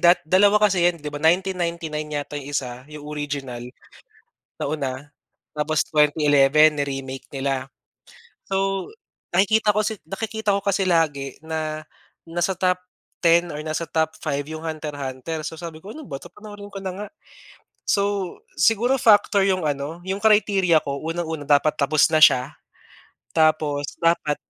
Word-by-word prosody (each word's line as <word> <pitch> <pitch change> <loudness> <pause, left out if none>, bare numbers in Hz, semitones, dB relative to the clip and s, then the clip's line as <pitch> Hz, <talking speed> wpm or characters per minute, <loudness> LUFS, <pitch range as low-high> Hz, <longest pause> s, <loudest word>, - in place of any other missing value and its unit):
da 175 +1 +6
2 200 +5 +5
kasi 205 -3 +3
'yan, 175 0 +3
'di 150 -2 -7
ba, 145 - -5
1999 170 -3 0
yata 145 0 -4
yung 140 - -10
1, 125 +1 -5
yung 150 -1 -10
original, 145 -4 -5 1.0
nauna. 140 -1 -4 0.4
Tapos 155 +1 0
2011 150 0 +5
ni-remake 135 -2 -4
nila. 135 -1 -2 0.8
So, 195 0 -1 0.5
nakikita 210 +3 +3
ko 215 - +2
si 215 0 -2
nakikita 220 +4 -2
ko 200 - 0
kasi 195 -1 0
lagi 150 -7 0
na 155 -1 -4 0.5
nasa 175 +3 0
top 180 0 +1 0.4
10 170 0 +3
or 150 - -6
nasa 155 +1 -3
top 160 0 0
5 145 -2 -2
yung 155 +1 -7
Hunter-hunter. 150 -1 -5
So, 160 +1 -6
sabi 160 -1 -8
ko, 195 - -11
"Ano 310 +8 -9
ba 140 -4 -7
'to, - - -11
panoorin 205 -1 -11
ko 200 - -9
na 190 -1 -4
nga." 205 +3 -6 0.8
So, 200 - +2 0.6
siguro 240 +4 +3
factor 205 -3 +4
yung 185 -2 +1
ano, 150 +3 -3
yung 190 +2 -3
criteria 200 -6 +4
ko. 140 0 -4
Unang-una, 160 -3 -3
dapat 150 +1 +3
tapos 150 +2 +3
na 160 - +3
siya, 135 -3 +6 0.8
tapos 155 -2 +2 0.2
dapat 160 -3 +2
160 Hz, 145 wpm, -23 LUFS, 145-190 Hz, 1.0 s, da